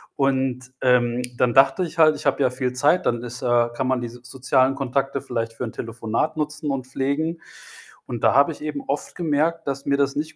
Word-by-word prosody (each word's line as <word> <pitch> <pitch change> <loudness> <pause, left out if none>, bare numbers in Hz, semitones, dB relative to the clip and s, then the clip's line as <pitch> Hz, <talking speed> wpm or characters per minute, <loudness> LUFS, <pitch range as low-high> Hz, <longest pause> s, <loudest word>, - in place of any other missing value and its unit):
Und, 130 -2 0
ähm, 125 -1 +3 0.2
dann 120 -2 +2
dachte 135 +6 +5
ich 165 -1 -6
halt, 155 -1 +6
ich 145 - -8
habe 140 0 +2
ja 130 - +3
viel 125 0 -2
Zeit, 150 +8 +2
dann 120 0 0
ist, 125 +2 -6
äh 120 -1 +3
kann 130 - -1
man 130 -1 +1
diese 120 +1 -7
sozialen 130 +1 +1
Kontakte 135 +1 -1
vielleicht 115 -2 -3
für 125 - -6
'n 110 - -7
Telefonat 115 +7 -3
nutzen 150 -1 -2
und 130 -2 -3
pflegen. 145 +5 -2 0.7
Und 120 -2 -5
da 110 - +5
habe 140 +4 +5
ich - - -15
eben 155 - -4
oft - - -3
gemerkt, 165 0 0
dass 140 0 -3
mir 140 0 +1
das 140 -1 +1
nicht 155 +2 -3
135 Hz, 215 wpm, -23 LUFS, 125-150 Hz, 0.7 s, halt